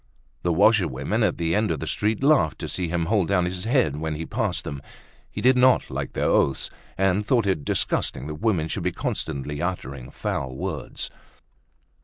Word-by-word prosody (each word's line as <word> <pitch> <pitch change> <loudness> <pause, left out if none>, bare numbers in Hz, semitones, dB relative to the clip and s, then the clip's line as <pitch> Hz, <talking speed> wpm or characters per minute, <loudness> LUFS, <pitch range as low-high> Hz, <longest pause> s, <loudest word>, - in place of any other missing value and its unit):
The 85 - +1
washerwomen 95 - +3
at 100 -6 +2
the 85 -1 0
end 105 +2 +2
of 80 -4 -1
the - - -4
street 110 +4 -1
laughed 140 - +4
to - - -3
see 90 -2 -2
him 85 0 -1
hold 100 -1 +2
down 90 -3 +2
his 90 +2 -4
head 115 - +2
when 80 0 -2
he 80 +2 -4
passed 110 -4 -1
them. 70 -1 -5 0.5
He - - -5
did 130 +1 +5
not 130 +1 +4
like - - -4
their - - -1
oaths, 70 - +2 0.3
and 95 +1 +2
thought 115 0 +2
it 95 -7 0
disgusting 65 -1 -1
that 75 +1 -6
women 90 -9 +1
should 95 - -3
be 90 +1 0
constantly 75 -2 -3
uttering 70 -8 -4
foul 65 -1 -3
words. - - -5
90 Hz, 190 wpm, -25 LUFS, 75-105 Hz, 0.5 s, did